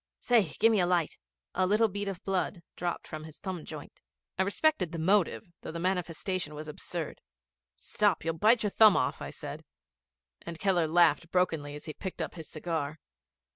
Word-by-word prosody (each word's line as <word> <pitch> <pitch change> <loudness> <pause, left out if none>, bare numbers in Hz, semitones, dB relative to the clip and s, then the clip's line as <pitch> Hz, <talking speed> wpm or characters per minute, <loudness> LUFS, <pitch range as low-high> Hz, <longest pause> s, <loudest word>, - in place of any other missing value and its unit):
Say, 225 -10 +3
gimme 225 -1 +5
a 175 - +3
light. 175 -3 +1 0.3
A 185 - +2
little 215 +3 +4
bead 205 0 -4
of 195 -3 -5
blood 185 -2 -1
dropped 175 -1 -3
from 155 0 -7
his 160 -1 -11
thumb 185 -5 -5
joint. - - -9 0.4
I - - 0
respected 200 - +1
the 170 - -4
motive, 185 +3 +2 0.2
though - - -6
the 165 - -5
manifestation 180 -2 -2
was 155 +1 -7
absurd. 150 - -5 0.5
'Stop, - - 0
you'll 165 - +1
bite 220 +4 +5
your 210 - 0
thumb 215 -2 +7
off,' - - 0
I - - -4
said, - - -7 0.8
and 170 - -7
Keller 180 -3 +2
laughed 165 -1 +4
brokenly 160 -6 0
as 150 - -9
he 155 - -5
picked 190 +3 -6
up - - -3
his 160 -3 -9
cigar. 155 -2 -3
175 Hz, 180 wpm, -30 LUFS, 160-195 Hz, 0.8 s, thumb